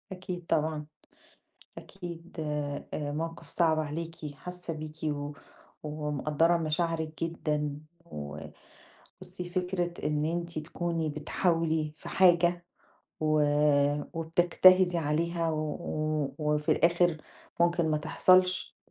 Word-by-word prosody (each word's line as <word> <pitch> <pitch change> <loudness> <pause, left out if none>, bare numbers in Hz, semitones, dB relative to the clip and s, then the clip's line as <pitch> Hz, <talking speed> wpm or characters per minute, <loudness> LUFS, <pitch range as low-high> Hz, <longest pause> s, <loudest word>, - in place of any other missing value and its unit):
أكيد 180 -1 -6
طبعًا، 155 -1 0 0.9
أكيد 175 -3 -9
آآ، 150 -2 -3 0.3
موقف 165 +2 -5
صعب 160 -3 +2
عليكِ 155 0 -5
حاسة 180 +1 -6
بيكِ، 155 0 -7
و 145 -1 -2 0.5
ومقدّرة 150 +2 +1
مشاعرِك 160 0 -1
جدًا، 150 -3 -2 0.3
و 75 - -7 0.8
بُصي 180 -1 -7
فكرة 180 -1 -2
إن 150 0 0
أنتِ 170 0 -2
تكوني 165 +1 -2
بتحاولي 160 0 0
في - - -10
حاجة، 175 -1 +4 0.5
و 155 -1 +3 0.7
وبتجتهدي 175 +2 +5
عليها، 165 +2 0
و 155 - -1
و 155 -2 -2 0.2
وفي 150 +1 +2
الآخر 170 +1 +3 0.4
ممكن 170 -1 +3
ما 155 - +2
تحصلش 185 +4 +3
165 Hz, 100 wpm, -29 LUFS, 150-175 Hz, 0.9 s, وبتجتهدي